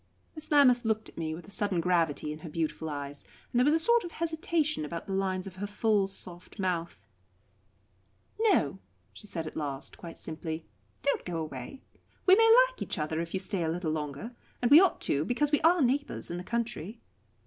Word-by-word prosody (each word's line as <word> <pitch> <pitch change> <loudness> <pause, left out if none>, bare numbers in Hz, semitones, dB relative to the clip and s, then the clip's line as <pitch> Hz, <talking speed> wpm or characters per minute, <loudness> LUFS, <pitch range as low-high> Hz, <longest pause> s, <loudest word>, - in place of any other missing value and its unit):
Miss 310 -1 -6
Lammas 260 -5 +5
looked 220 -1 -1
at - - -19
me 160 -1 -2
with 170 - -11
a - - -12
sudden 200 -4 +1
gravity 165 -4 +1
in 155 - -10
her 160 - -8
beautiful 160 0 -2
eyes, 145 -1 -6 0.3
and 240 - +3
there - - +5
was 295 +3 +4
a - - +5
sort 470 +8 +3
of 345 - -7
hesitation 320 - 0
about 165 +2 -5
the 195 - -4
lines 190 -1 -1
of 190 -1 -9
her 205 +2 -3
full, 205 -1 +2
soft 180 -2 -9
mouth. 180 -4 -2 1.4
"No," 375 - +2 0.3
she 210 - -13
said 165 -5 -4
at 155 - -7
last, 145 -1 -5
quite 170 -2 -9
simply, 160 0 -5 0.4
"don't 280 - +1
go 175 -2 -4
away. 155 - -6 0.4
We 370 - +7
may 450 +1 +6
like - - -11
each - - -2
other, 155 +1 -1
if 170 +2 -5
you - - 0
stay 190 -1 -2
a 160 - 0
little 165 -1 -1
longer 155 - -4 0.2
and 245 +1 +1
we 305 +4 +10
ought 385 - +2
to 145 +1 +1
because 285 - +1
we 295 - +3
are 330 -1 +5
neighbours 270 -3 -1
in 175 - -3
the 175 - -5
country." 230 -2 -3
190 Hz, 205 wpm, -29 LUFS, 160-270 Hz, 1.4 s, we